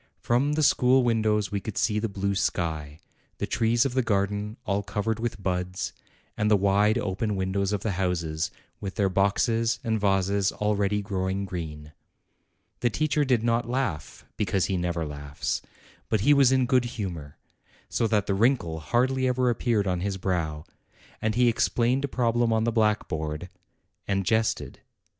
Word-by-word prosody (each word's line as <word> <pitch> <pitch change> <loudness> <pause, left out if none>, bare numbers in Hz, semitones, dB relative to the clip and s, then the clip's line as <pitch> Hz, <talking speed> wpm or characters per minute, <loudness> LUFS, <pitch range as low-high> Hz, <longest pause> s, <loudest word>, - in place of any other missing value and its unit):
From 130 +5 +1
the 155 +1 +1
school 130 -1 +4
windows 110 -4 +1
we 100 - -1
could 110 - -6
see 105 -2 +1
the 115 +1 -2
blue 100 0 -1
sky, 80 -6 -2 0.4
the - - -2
trees 115 +1 +2
of 135 - -1
the 130 - +2
garden 105 0 -1
all 100 0 0
covered 105 +2 -2
with 115 -2 -3
buds, 90 0 -2 0.4
and 105 - +1
the 105 - +5
wide 100 +2 +3
open 100 +2 -1
windows 95 +1 -1
of 105 - -1
the 110 - 0
houses, 85 -4 -1 0.3
with 95 -2 -5
their 100 -2 +2
boxes 115 +5 +1
and 110 -1 0
vases 100 0 +2
already 105 -1 0
growing 95 0 -2
green. 75 -5 -6 0.9
The 120 - +2
teacher 150 +4 +1
did 125 -5 +2
not 115 0 +1
laugh, 115 - -3
because 95 -2 +1
he 95 - -1
never 85 -2 -1
laughs; 70 -1 -4 0.5
but 110 -3 +1
he 145 +8 +5
was 135 -3 +5
in 130 -1 +3
good 125 -1 +3
humor, 85 -9 -5 0.5
so 115 - 0
that 105 -2 +1
the 100 - 0
wrinkle 100 -7 +1
hardly 130 +8 +1
ever 125 -1 +2
appeared 115 -3 0
on 90 -2 0
his 95 +1 -2
brow; 80 -5 -2 0.6
and 110 -1 0
he 125 0 +4
explained 120 +3 +1
a - - +1
problem 120 -2 +1
on 110 0 +2
the 115 - +1
blackboard, 90 -7 -1 0.6
and 100 -1 0
jested. 110 +3 0
105 Hz, 165 wpm, -26 LUFS, 95-115 Hz, 0.9 s, the